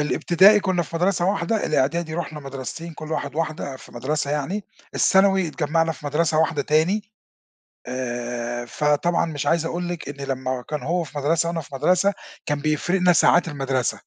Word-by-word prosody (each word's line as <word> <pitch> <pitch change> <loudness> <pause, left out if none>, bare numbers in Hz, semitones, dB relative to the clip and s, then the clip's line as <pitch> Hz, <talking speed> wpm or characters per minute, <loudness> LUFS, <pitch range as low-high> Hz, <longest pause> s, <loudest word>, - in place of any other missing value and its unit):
الابتدائي 185 +7 +5
كنّا 185 -3 0
في 165 - -6
مدرسة 180 +1 +1
واحدة 200 +2 0
الإعدادي 155 +3 0
رُحنا 155 -3 -4
مدرستين 140 +5 -7
كل 155 0 -7
واحد - - -3
واحدة 155 -4 -3
في - - -15
مدرسة 140 +4 -2
يعني، 175 +8 -2 0.3
الثانوي 190 -2 +4
اتجمّعنا 165 +1 0
في 145 0 -10
مدرسة 155 +2 +1
واحدة 160 -2 +2
تاني. 185 +9 +1 0.7
آآ، 120 -1 -4
فطبعًا 150 +6 +1
مش 145 -3 -4
عايز 165 +1 +2
أقول 175 +1 -3
لِك 175 -5 -5
إن 140 -1 -6
لمّا 130 -1 -2
كان 150 -1 -3
هو 175 +2 0
في 150 -1 -8
مدرسة 165 +4 +1
وأنا 170 -1 -2
في 145 -2 -11
مدرسة 185 +7 +2 0.3
كان 145 -1 -1
بيفرِقنا 175 +5 +2
ساعات 175 +1 +4
المدرسة. 135 -4 -1
155 Hz, 165 wpm, -23 LUFS, 140-175 Hz, 0.7 s, الابتدائي